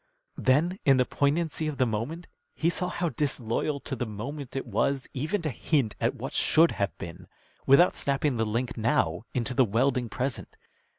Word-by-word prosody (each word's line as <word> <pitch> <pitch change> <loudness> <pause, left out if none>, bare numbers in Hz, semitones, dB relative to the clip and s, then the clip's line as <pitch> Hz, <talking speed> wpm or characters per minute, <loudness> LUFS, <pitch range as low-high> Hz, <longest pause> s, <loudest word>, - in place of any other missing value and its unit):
Then 165 +9 +2
in 135 -2 +5
the 125 - +3
poignancy 155 +4 0
of 150 -3 -3
the 130 - +3
moment 125 +10 -3 0.3
he 165 +2 +1
saw 180 +1 -1
how 175 -1 -1
disloyal 140 0 -1
to 135 - -4
the 125 -1 -3
moment 130 +7 -6
it 135 - -2
was 130 +4 0
even 160 +8 -2
to 155 - -1
hint 125 -2 0
at - - +1
what - - -6
should 165 +2 +4
have 100 -1 -2
been, 85 -1 -9 0.4
without 155 +7 +6
snapping 140 -1 0
the 115 - +1
link 120 +3 -2
now 110 -4 0
into 125 +1 -1
the 130 - +4
welding 120 +2 +1
present. 130 +1 -4
135 Hz, 180 wpm, -27 LUFS, 115-155 Hz, 0.4 s, without